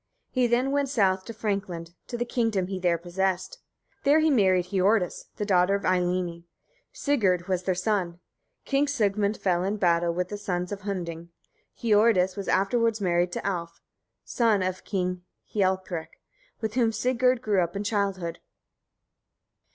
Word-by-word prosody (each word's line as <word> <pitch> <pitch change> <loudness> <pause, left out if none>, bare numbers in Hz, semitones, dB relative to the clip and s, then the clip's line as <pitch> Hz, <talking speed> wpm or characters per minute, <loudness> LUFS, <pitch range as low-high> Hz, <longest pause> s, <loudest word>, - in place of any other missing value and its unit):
He 255 -2 +2
then 245 +3 +1
went 280 -1 +1
south 195 -7 +2
to - - -6
Frankland, 195 -6 -3
to 240 - -4
the 240 - -1
kingdom 225 -6 0
he 190 0 -4
there 175 -2 +2
possessed. 185 - -2 0.4
There 290 +1 +5
he 315 0 +3
married 185 -7 +3
Hiordis, 195 0 +1
the 210 - -3
daughter 185 -1 +3
of 200 - -3
Eylimi. 180 -2 0 0.5
Sigurd 195 - +1
was 185 -2 0
their 185 0 0
son. 180 -3 -1 0.5
King 275 +1 +2
Sigmund 210 -6 +1
fell 180 -2 +1
in 200 +2 -1
a - - -6
battle 170 -3 +2
with 180 +1 -2
the 205 - -5
sons 180 -3 -3
of 200 0 -5
Hunding. 170 -4 -5 0.5
Hiordis 210 -4 +3
was 200 -2 -5
afterwards 225 +3 +2
married 175 -2 +1
to - - -4
Alf, 170 -4 -3 0.5
son 220 -5 +2
of 185 0 -3
King 180 -2 -2 0.3
Hialprek, 185 -4 -1 0.4
with 220 -1 -2
whom 235 -2 +2
Sigurd 250 +2 +1
grew 205 -5 +2
up 175 +1 -2
in 200 - -2
childhood. 195 -5 -1
195 Hz, 160 wpm, -26 LUFS, 180-220 Hz, 0.5 s, There